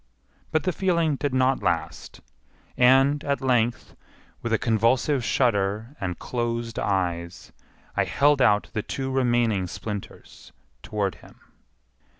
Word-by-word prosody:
But 155 Hz, 0 st, +1 dB
the 185 Hz, -, +1 dB
feeling 170 Hz, -4 st, +1 dB
did 145 Hz, +1 st, -2 dB
not 130 Hz, +1 st, +2 dB
last; -, -, -3 dB, 0.5 s
and, 135 Hz, +3 st, +4 dB
at 140 Hz, -1 st, -1 dB
length, 120 Hz, -3 st, 0 dB, 0.5 s
with 120 Hz, -, -3 dB
a 110 Hz, -, +3 dB
convulsive 120 Hz, +5 st, +1 dB
shudder 110 Hz, 0 st, 0 dB
and 90 Hz, -3 st, -3 dB
closed 115 Hz, -1 st, -3 dB
eyes, 85 Hz, -3 st, -2 dB, 0.4 s
I -, -, +2 dB
held 145 Hz, 0 st, +3 dB
out 105 Hz, -4 st, +3 dB
the 110 Hz, -, -1 dB
two 135 Hz, +4 st, -4 dB
remaining 120 Hz, -7 st, +1 dB
splinters 105 Hz, +2 st, -8 dB, 0.3 s
toward 100 Hz, -3 st, -2 dB
him. -, -, -17 dB
120 Hz, 125 wpm, -25 LUFS, 105-135 Hz, 0.5 s, and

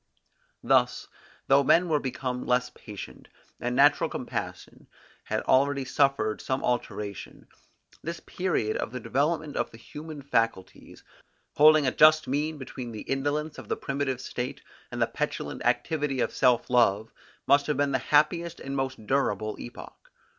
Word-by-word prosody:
Thus, -, -, +2 dB, 0.4 s
though 140 Hz, +1 st, +5 dB
men 170 Hz, +6 st, +4 dB
were 155 Hz, -3 st, +2 dB
become 130 Hz, -1 st, -4 dB
less 125 Hz, 0 st, +1 dB
patient, 105 Hz, -3 st, -10 dB, 0.3 s
and 125 Hz, +1 st, -2 dB
natural 140 Hz, +3 st, +4 dB
compassion -, -, -6 dB, 0.4 s
had -, -, -1 dB
already 140 Hz, +1 st, +2 dB
suffered 130 Hz, -7 st, +1 dB
some 130 Hz, 0 st, -2 dB
alteration, 105 Hz, -5 st, -4 dB, 0.6 s
this 170 Hz, +1 st, -5 dB
period 180 Hz, -12 st, -1 dB
of -, -, -3 dB
the 125 Hz, -, -5 dB
development 145 Hz, +6 st, -1 dB
of -, -, -1 dB
the 115 Hz, -, -14 dB
human 150 Hz, +4 st, -9 dB
faculties, 115 Hz, -8 st, -2 dB, 0.5 s
holding 155 Hz, 0 st, +6 dB
a 130 Hz, -, +2 dB
just 155 Hz, +2 st, +5 dB
mean 150 Hz, +3 st, -1 dB
between 130 Hz, -3 st, -7 dB
the 110 Hz, -, -6 dB
indolence 145 Hz, +3 st, -2 dB
of -, -, -10 dB
the -, -, -1 dB
primitive 140 Hz, -2 st, -2 dB
state, 125 Hz, -1 st, -5 dB, 0.3 s
and -, -, -5 dB
the -, -, +4 dB
petulant -, -, -4 dB
activity 150 Hz, -4 st, 0 dB
of -, -, 0 dB
self 125 Hz, -2 st, +3 dB
love, 110 Hz, -3 st, +3 dB, 0.3 s
must 140 Hz, 0 st, +4 dB
have 150 Hz, -3 st, 0 dB
been 145 Hz, -1 st, +1 dB
the 130 Hz, -, +1 dB
happiest 160 Hz, +5 st, +1 dB
and 135 Hz, 0 st, -5 dB
most 130 Hz, -4 st, -3 dB
durable 110 Hz, -5 st, 0 dB
epoch. -, -, -11 dB
135 Hz, 150 wpm, -27 LUFS, 125-150 Hz, 0.6 s, holding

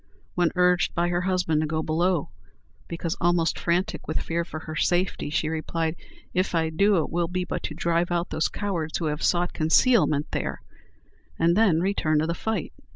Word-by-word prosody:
When 175 Hz, -2 st, +2 dB
urged 180 Hz, 0 st, +3 dB
by 175 Hz, +1 st, +1 dB
her 175 Hz, 0 st, 0 dB
husband 180 Hz, -4 st, +1 dB
to 155 Hz, -, -1 dB
go 155 Hz, +1 st, -1 dB
below, 170 Hz, 0 st, 0 dB, 0.6 s
because 170 Hz, 0 st, -3 dB
almost 170 Hz, -2 st, +2 dB
frantic 175 Hz, +2 st, -1 dB
with 155 Hz, -, -1 dB
fear 170 Hz, +1 st, -2 dB
for 160 Hz, -2 st, -7 dB
her 155 Hz, 0 st, -7 dB
safety, 175 Hz, -1 st, 0 dB
she 155 Hz, +1 st, 0 dB
replied, 160 Hz, +1 st, -2 dB, 0.4 s
"If 185 Hz, -1 st, 0 dB
I 160 Hz, -1 st, +1 dB
do, 200 Hz, +4 st, +3 dB
it -, -, -7 dB
will 170 Hz, 0 st, 0 dB
be 180 Hz, +1 st, -2 dB
but -, -, -4 dB
to 155 Hz, -, -5 dB
drive 170 Hz, +1 st, 0 dB
out 175 Hz, 0 st, -1 dB
those 155 Hz, -, +1 dB
cowards 175 Hz, -6 st, -3 dB
who 165 Hz, -, -3 dB
have 150 Hz, 0 st, -2 dB
sought 175 Hz, 0 st, +1 dB
concealment 155 Hz, -, +3 dB
there," -, -, -3 dB, 0.7 s
and 170 Hz, +1 st, +3 dB
then 190 Hz, -7 st, +4 dB
return 175 Hz, -5 st, +1 dB
to 155 Hz, -, +2 dB
the 170 Hz, -, -1 dB
fight. 220 Hz, +5 st, -3 dB
170 Hz, 190 wpm, -25 LUFS, 160-180 Hz, 0.7 s, then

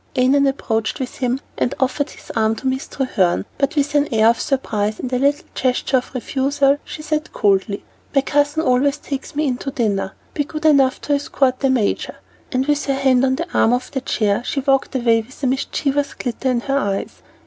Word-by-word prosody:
Annon 275 Hz, +2 st, +4 dB
approached 225 Hz, -5 st, -1 dB
with 260 Hz, -2 st, -5 dB
him 250 Hz, 0 st, 0 dB, 0.2 s
and 250 Hz, -, 0 dB
offered 275 Hz, +3 st, 0 dB
his -, -, -11 dB
arm 220 Hz, -1 st, +2 dB
to 245 Hz, -, -10 dB
Miss 265 Hz, 0 st, -1 dB
Treherne, 195 Hz, -10 st, 0 dB
but 275 Hz, +2 st, +1 dB
with 290 Hz, -1 st, +1 dB
an 290 Hz, 0 st, +2 dB
air 220 Hz, -1 st, +5 dB
of 235 Hz, -, +1 dB
surprise, 215 Hz, -6 st, -1 dB
and 255 Hz, 0 st, -4 dB
a 250 Hz, -, +2 dB
little 285 Hz, +2 st, +1 dB
gesture 255 Hz, +1 st, +1 dB
of 255 Hz, +1 st, -5 dB
refusal, 275 Hz, +2 st, +1 dB
she 305 Hz, -, -8 dB
said 305 Hz, +1 st, -2 dB
coldly: 200 Hz, 0 st, +1 dB, 0.3 s
"My 275 Hz, -, +5 dB
cousin 290 Hz, +3 st, +1 dB
always 275 Hz, +2 st, +2 dB
takes 280 Hz, -1 st, -6 dB
me 305 Hz, +1 st, +1 dB
in 255 Hz, -3 st, 0 dB
to 275 Hz, -, -5 dB
dinner. 200 Hz, -7 st, -1 dB, 0.2 s
Be 290 Hz, -, 0 dB
good 310 Hz, +2 st, -6 dB
enough 275 Hz, -4 st, +4 dB
to 290 Hz, -, -1 dB
escort 280 Hz, -3 st, +1 dB
the 270 Hz, -, +2 dB
major." 245 Hz, -6 st, 0 dB, 0.4 s
And 255 Hz, 0 st, +1 dB
with 295 Hz, 0 st, +1 dB
her 275 Hz, -, +1 dB
hand 265 Hz, -2 st, +3 dB
on 260 Hz, 0 st, +3 dB
the -, -, -3 dB
arm 225 Hz, -, +4 dB
of 250 Hz, +1 st, -2 dB
the 265 Hz, -, -2 dB
chair, 210 Hz, -5 st, 0 dB
she 275 Hz, +1 st, -2 dB
walked 270 Hz, 0 st, +1 dB
away 230 Hz, -3 st, +3 dB
with 255 Hz, +5 st, -16 dB
a -, -, +3 dB
mischievous 275 Hz, +2 st, -1 dB
glitter 255 Hz, +1 st, -2 dB
in 245 Hz, -2 st, +1 dB
her 275 Hz, +2 st, 0 dB
eyes. 200 Hz, -6 st, -3 dB
265 Hz, 210 wpm, -20 LUFS, 240-280 Hz, 0.4 s, air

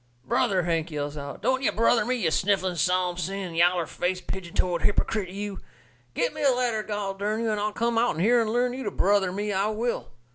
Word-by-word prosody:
"Brother!" 195 Hz, -, +2 dB
Hank 165 Hz, -1 st, 0 dB
yells 145 Hz, -1 st, -4 dB
out, 140 Hz, -1 st, -7 dB
"don't 260 Hz, 0 st, +2 dB
ye 270 Hz, -, +2 dB
brother 230 Hz, +1 st, +3 dB
me, 255 Hz, +1 st, 0 dB
you 180 Hz, -10 st, 0 dB
sniffling, 190 Hz, 0 st, +1 dB
psalm 180 Hz, +2 st, +1 dB
singing, 185 Hz, 0 st, -3 dB
yaller 175 Hz, +1 st, +3 dB
faced, 180 Hz, +2 st, -3 dB
pigeon 180 Hz, -3 st, -6 dB
toed 175 Hz, -2 st, +1 dB
hippercrit, 205 Hz, -2 st, 0 dB
you! 200 Hz, +1 st, -5 dB, 0.6 s
Get -, -, 0 dB
me -, -, -6 dB
a 280 Hz, -, +5 dB
ladder, 245 Hz, -4 st, +1 dB
gol 205 Hz, -2 st, -3 dB
dern 210 Hz, +3 st, -2 dB
you, 225 Hz, -1 st, 0 dB
and 210 Hz, -, -1 dB
I'll 210 Hz, +1 st, 0 dB
come 230 Hz, +1 st, 0 dB
out'n 230 Hz, -9 st, +1 dB
here 235 Hz, +6 st, +4 dB
and 220 Hz, -, -1 dB
learn 245 Hz, +1 st, +1 dB
you 260 Hz, -, -5 dB
to -, -, 0 dB
brother 195 Hz, -1 st, +2 dB
me, 205 Hz, +2 st, -2 dB
I 195 Hz, +2 st, +1 dB
will." 225 Hz, +3 st, -2 dB
200 Hz, 220 wpm, -26 LUFS, 180-225 Hz, 0.6 s, a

